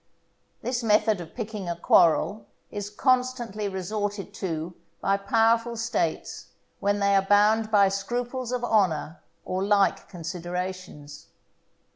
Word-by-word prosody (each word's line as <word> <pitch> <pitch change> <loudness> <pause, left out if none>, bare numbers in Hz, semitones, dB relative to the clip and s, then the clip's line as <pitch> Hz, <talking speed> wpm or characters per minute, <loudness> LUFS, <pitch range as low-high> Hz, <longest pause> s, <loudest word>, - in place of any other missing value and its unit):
This 245 0 -1
method 215 -3 +2
of 165 -2 -11
picking 215 -5 -5
a 170 - -2
quarrel 180 +5 +3 0.2
is 205 0 -5
constantly 245 -3 0
resorted 200 +1 -4
to 165 -2 -4 0.3
by 195 - +1
powerful 230 +3 +2
States 230 +1 -2 0.3
when 205 0 +1
they 200 0 +2
are 195 - +5
bound 210 +3 +3
by 200 -2 +5
scruples 240 +6 -3
of 250 -1 -2
honour 180 -9 +1 0.2
or 185 +1 -2
like 200 0 +2
considerations. 180 -3 -6
205 Hz, 120 wpm, -26 LUFS, 185-225 Hz, 0.3 s, are